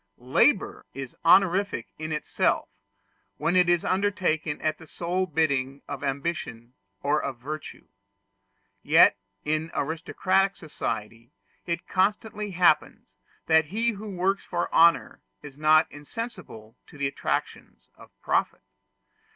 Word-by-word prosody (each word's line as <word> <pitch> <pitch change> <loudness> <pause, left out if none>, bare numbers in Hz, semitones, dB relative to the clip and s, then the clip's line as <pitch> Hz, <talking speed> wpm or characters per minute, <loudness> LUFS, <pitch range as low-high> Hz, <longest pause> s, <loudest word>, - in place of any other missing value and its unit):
Labor 125 +2 +1
is 135 -2 -7
honorific 185 - +3
in 155 0 -5
itself, 150 - 0 0.7
when 170 +2 0
it 180 -1 +4
is 175 -1 +2
undertaken 185 -6 0
at 155 0 -1
the 160 - -13
sole 180 +4 -2
bidding 140 -4 0
of - - -6
ambition 135 -4 -4 0.3
or 145 +2 +2
of 135 -3 -4
virtue. 150 +5 -8 0.9
Yet - - +6 0.3
in 155 +2 -1
aristocratic 185 +5 0
society 115 - -6 0.3
it 170 0 -3
constantly 210 +2 0
happens 180 -4 +1 0.3
that 160 -1 +4
he 225 +9 0
who 210 0 -8
works 195 +3 0
for 175 - -3
honor 170 +1 +4 0.2
is 145 -2 -10
not 155 +2 +5
insensible 145 - -8
to - - -15
the 140 - -1
attractions 135 0 -4
of - - -16
profit. - - 0
160 Hz, 120 wpm, -26 LUFS, 140-185 Hz, 0.9 s, Yet